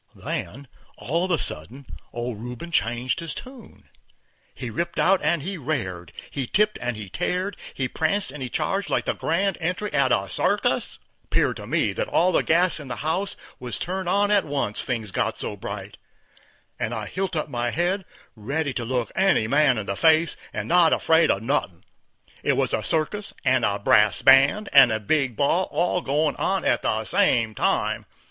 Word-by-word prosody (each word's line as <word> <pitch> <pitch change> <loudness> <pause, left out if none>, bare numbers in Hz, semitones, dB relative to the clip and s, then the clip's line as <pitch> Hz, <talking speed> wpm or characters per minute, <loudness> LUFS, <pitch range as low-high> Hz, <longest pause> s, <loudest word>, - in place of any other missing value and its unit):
Then, 140 +2 -5 0.3
all 165 +7 -1
of - - -5
a 170 - +2
sudden, 125 - -5 0.3
old 120 -2 -4
Rubin 125 +8 -7
changed 120 -3 0
his 165 -2 -6
tune. 255 -4 -12 0.7
He 125 -3 -5
ripped 170 +9 -3
out 195 0 +3
and 155 -1 +1
he 190 +1 -4
rared, 95 - -3 0.2
he 135 -3 -3
tipped 210 - +1
and 125 -2 -2
he 105 -2 -7
tared, 180 - -2 0.2
he 130 - -1
pranced 160 +7 -1
and 145 0 -9
he 130 - -3
charged 195 +10 -1
like - - 0
the - - 0
grand 190 +4 -1
entry 180 +5 -2
at 135 -2 +2
a 95 - +1
circus. 90 - 0 0.3
'Peared - - +1
to - - -9
me - - +1
that - - -2
all 180 +2 +2
the - - +3
gas 170 +1 +2
in 145 - -9
the 125 - -4
house 190 +5 -1 0.2
was 125 -1 -4
turned 185 0 -3
on 205 +2 +2
at 205 -2 +4
once, 140 -8 -2
things 115 -6 -3
got - - -1
so - - -4
bright, - - -7 0.8
and 115 +2 -2
I 110 -2 -4
hilt 185 - -3
up 155 - -1
my 120 -2 -1
head, 180 +8 0 0.3
ready 140 +6 -2
to 120 - -3
look 125 0 -2
any 190 - +3
man 140 0 +3
in 105 - -3
the 100 - -3
face, 160 +6 +3 0.2
and - - -4
not 170 -1 +5
afraid 160 0 +3
of 100 - +1
nothin'. 115 -9 -1 0.6
It - - +2
was - - 0
a - - +1
circus 180 +6 -2
and 130 -1 +3
a 100 -2 +1
brass 105 +3 +3
band 140 - +5
and 135 -4 +8
a 110 - 0
big 130 +2 0
ball 165 - +1
all 180 +1 0
goin' 150 0 0
on - - 0
at - - +2
the - - 0
same 115 -2 +2
time. - - 0
145 Hz, 190 wpm, -24 LUFS, 120-175 Hz, 0.8 s, and